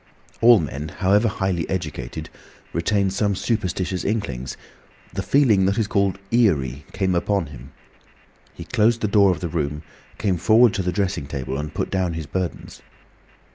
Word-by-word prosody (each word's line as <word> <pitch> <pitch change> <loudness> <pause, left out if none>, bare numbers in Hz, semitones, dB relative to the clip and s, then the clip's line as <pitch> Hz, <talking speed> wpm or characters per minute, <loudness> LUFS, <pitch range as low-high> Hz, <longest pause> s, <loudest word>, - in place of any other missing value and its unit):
All 120 -1 +8
men, 75 -1 -4
however 100 +6 +2
highly 95 -5 -1
educated, 75 -9 -4 0.4
retain 95 +3 +1
some 100 +1 0
superstitious 95 -4 -2
inklings. 70 - -3 0.6
The - - -2
feeling 115 -9 +3
that 100 - 0
is 110 - +2
called 100 -2 +1
"eerie" 70 - +2
came 95 -2 0
upon 95 +1 0
him. 65 +1 -12 0.8
He - - -8
closed 115 0 +2
the 105 - +1
door 100 -1 +5
of 90 - -1
the 90 - -2
room, 75 -2 -3 0.3
came 95 -4 0
forward 110 +6 +5
to 95 - -1
the 90 -1 -1
dressing 90 -6 -1
table, 65 -2 -4
and 75 +2 -4
put - - -3
down 95 -3 0
his 80 -1 -5
burdens. 90 +4 -5
95 Hz, 160 wpm, -22 LUFS, 80-105 Hz, 0.8 s, All